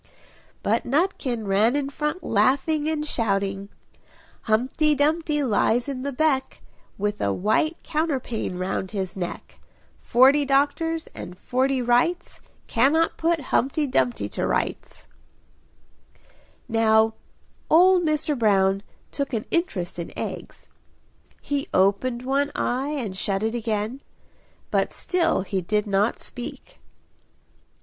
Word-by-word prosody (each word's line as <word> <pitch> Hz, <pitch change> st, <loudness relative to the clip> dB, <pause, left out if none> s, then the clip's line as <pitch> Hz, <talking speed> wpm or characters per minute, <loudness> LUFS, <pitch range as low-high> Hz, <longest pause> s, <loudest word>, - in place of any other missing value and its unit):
But -, -, +1 dB
Nutkin 265 Hz, -, -1 dB
ran 205 Hz, +6 st, +3 dB
in 285 Hz, -1 st, 0 dB
front 300 Hz, +5 st, -3 dB
laughing, 275 Hz, +8 st, +2 dB
and 305 Hz, -1 st, -1 dB
shouting 200 Hz, -6 st, -1 dB, 0.8 s
"Humpty 260 Hz, +7 st, +2 dB
Dumpty 300 Hz, +1 st, +1 dB
lies 235 Hz, +1 st, +1 dB
in 270 Hz, -2 st, -4 dB
the 280 Hz, +2 st, -3 dB
beck, 275 Hz, -1 st, 0 dB, 0.3 s
With 205 Hz, +1 st, -2 dB
a 100 Hz, -, +1 dB
white 220 Hz, -, +1 dB
counterpane 270 Hz, -, -2 dB
round 185 Hz, +1 st, -2 dB
his 190 Hz, -3 st, -4 dB
neck, 180 Hz, -3 st, -6 dB, 0.4 s
Forty 265 Hz, +4 st, +5 dB
doctors 290 Hz, +4 st, +1 dB
and 180 Hz, -, -8 dB
forty 260 Hz, +2 st, 0 dB
wrights, 245 Hz, +9 st, +1 dB, 0.2 s
Cannot 295 Hz, +8 st, +2 dB
put 335 Hz, 0 st, +1 dB
Humpty 280 Hz, +4 st, +1 dB
Dumpty 125 Hz, -, 0 dB
to -, -, -2 dB
rights!" -, -, -3 dB, 1.6 s
Now 220 Hz, 0 st, +3 dB, 0.6 s
old 360 Hz, +2 st, +6 dB
Mr. 305 Hz, -1 st, 0 dB
Brown 195 Hz, -4 st, +2 dB, 0.3 s
took 280 Hz, -2 st, -3 dB
an 220 Hz, -2 st, -2 dB
interest 195 Hz, -, -1 dB
in 170 Hz, -, -5 dB
eggs; -, -, -6 dB, 0.8 s
he 285 Hz, -1 st, -2 dB
opened 205 Hz, +6 st, +2 dB
one 280 Hz, +2 st, 0 dB
eye 260 Hz, +4 st, -1 dB
and 245 Hz, -10 st, -3 dB
shut 195 Hz, +1 st, -1 dB
it 220 Hz, +1 st, 0 dB
again. 225 Hz, +2 st, -2 dB, 0.7 s
But -, -, +1 dB
still 345 Hz, -, 0 dB
he 190 Hz, 0 st, -2 dB
did 210 Hz, +4 st, 0 dB
not 205 Hz, +2 st, +1 dB
speak. 255 Hz, -, -9 dB
255 Hz, 120 wpm, -24 LUFS, 210-295 Hz, 1.6 s, old